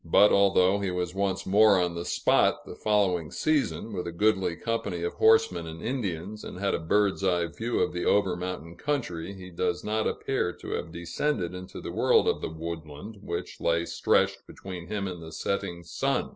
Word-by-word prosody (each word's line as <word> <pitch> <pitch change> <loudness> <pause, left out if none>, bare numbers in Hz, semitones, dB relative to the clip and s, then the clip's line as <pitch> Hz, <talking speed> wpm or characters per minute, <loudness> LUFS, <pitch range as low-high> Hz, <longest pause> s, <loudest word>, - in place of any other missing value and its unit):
but 100 +5 +5
although 100 0 +4
he 100 -1 -1
was 90 -1 -2
once 95 -1 -1
more 100 0 +5
on 90 -1 0
the 85 0 -4
spot 90 - +2
the - - -8
following 95 -7 +1
season, 145 - 0
with 90 -2 -3
a - - -3
goodly 95 -1 +1
company 100 -6 -2
of 85 - -2
horsemen 110 -7 +4
and 80 +1 -8
Indians, 105 -4 -3
and - - -7
had 100 +1 0
a - - 0
bird's 100 +4 +1
eye 90 -2 +2
view 110 +8 -3
of - - +1
the 90 - -2
over 100 -3 +3
mountain 90 -2 -5
country, 100 - -2
he 90 -1 -10
does 90 0 -1
not 110 +1 0
appear 135 -9 -1
to - - -9
have 85 - -3
descended 90 - -2
into 90 0 -8
the - - -6
world - - +3
of - - 0
woodland 80 +5 -7
which 85 -3 -5
lay 85 0 +1
stretched - - +1
between 90 -3 -8
him 105 -2 -2
and 90 -2 -6
the 80 0 -9
setting 90 -1 -3
sun. 85 - -1
90 Hz, 190 wpm, -28 LUFS, 85-105 Hz, -, but